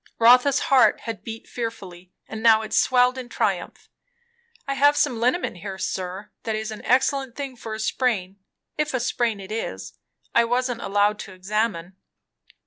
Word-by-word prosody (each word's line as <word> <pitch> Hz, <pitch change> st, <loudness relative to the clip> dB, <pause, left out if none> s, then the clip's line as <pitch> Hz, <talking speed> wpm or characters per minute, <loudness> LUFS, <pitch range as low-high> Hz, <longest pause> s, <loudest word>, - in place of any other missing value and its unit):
Rotha's 250 Hz, +4 st, +5 dB
heart 270 Hz, -2 st, +4 dB
had 225 Hz, -2 st, -6 dB
beat 225 Hz, 0 st, -8 dB
fearfully, 185 Hz, -7 st, -7 dB, 0.2 s
and 220 Hz, -, -7 dB
now 220 Hz, -1 st, +5 dB
it 220 Hz, -, -7 dB
swelled 250 Hz, 0 st, +3 dB
in 245 Hz, -1 st, -8 dB
triumph. -, -, -2 dB, 0.8 s
"I 275 Hz, -, 0 dB
have 285 Hz, +2 st, +4 dB
some 250 Hz, -6 st, +1 dB
liniment 250 Hz, -, 0 dB
here, 190 Hz, +1 st, -7 dB
sir, 190 Hz, +2 st, -4 dB
that 220 Hz, -, -2 dB
is 220 Hz, 0 st, -4 dB
an 215 Hz, -, -8 dB
excellent 265 Hz, 0 st, +1 dB
thing 275 Hz, -3 st, -5 dB
for 225 Hz, -2 st, -6 dB
a -, -, -8 dB
sprain 200 Hz, -5 st, -1 dB, 0.4 s
if 300 Hz, -3 st, 0 dB
a -, -, +1 dB
sprain 235 Hz, -3 st, -1 dB
it 195 Hz, +1 st, -9 dB
is; 225 Hz, +1 st, -5 dB, 0.4 s
I 235 Hz, -, +5 dB
wasn't 245 Hz, 0 st, -1 dB
allowed 205 Hz, +1 st, +1 dB
to 195 Hz, -, -8 dB
examine." 190 Hz, -2 st, -2 dB
225 Hz, 165 wpm, -24 LUFS, 205-250 Hz, 0.8 s, Rotha's